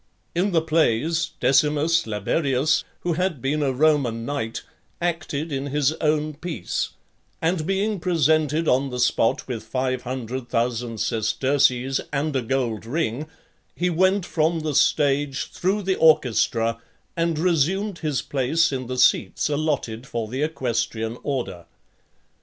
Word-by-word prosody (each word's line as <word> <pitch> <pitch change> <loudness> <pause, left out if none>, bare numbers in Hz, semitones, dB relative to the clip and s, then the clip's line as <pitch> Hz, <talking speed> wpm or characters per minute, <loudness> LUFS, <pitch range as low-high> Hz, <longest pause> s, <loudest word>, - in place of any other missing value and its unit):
In 180 +4 +1
the 165 -4 +2
plays, 160 +1 +1
Decimus 150 +2 +3
Laberius, 135 - +1 0.2
who 175 - 0
had 180 -3 -1
been 145 +5 -1
a 140 -2 +1
Roman 130 -5 +2
knight, 130 -5 -3 0.4
acted 165 -3 -2
in 135 0 -2
his 145 +1 +1
own 155 0 +1
piece; 155 - -4 0.5
and 165 -1 0
being 195 +1 0
presented 160 -2 +2
on 135 +2 +2
the 125 - -5
spot 120 -2 +1
with 120 -4 -4
five 130 +3 -2
hundred 125 0 -5
thousand 120 -1 -1
sesterces, 130 +4 +1
and 145 +1 -1
a 130 - +2
gold 120 -3 -1
ring, 150 0 -2 0.5
he 180 +1 0
went 185 +2 +2
from 160 +1 0
the 155 -1 -2
stage, 140 0 +2
through 195 +3 -1
the 190 0 0
orchestra, 115 -6 +3 0.3
and 165 -1 0
resumed 180 +4 +1
his 150 -6 -1
place 145 +5 +1
in 130 -2 -3
the 130 +1 -4
seats 125 - +3
(27) 150 - 0
allotted 130 -5 -2
for 115 -3 -3
the 130 +5 -4
equestrian 120 -6 -1
order. 95 - -4
145 Hz, 140 wpm, -23 LUFS, 125-165 Hz, 0.5 s, Decimus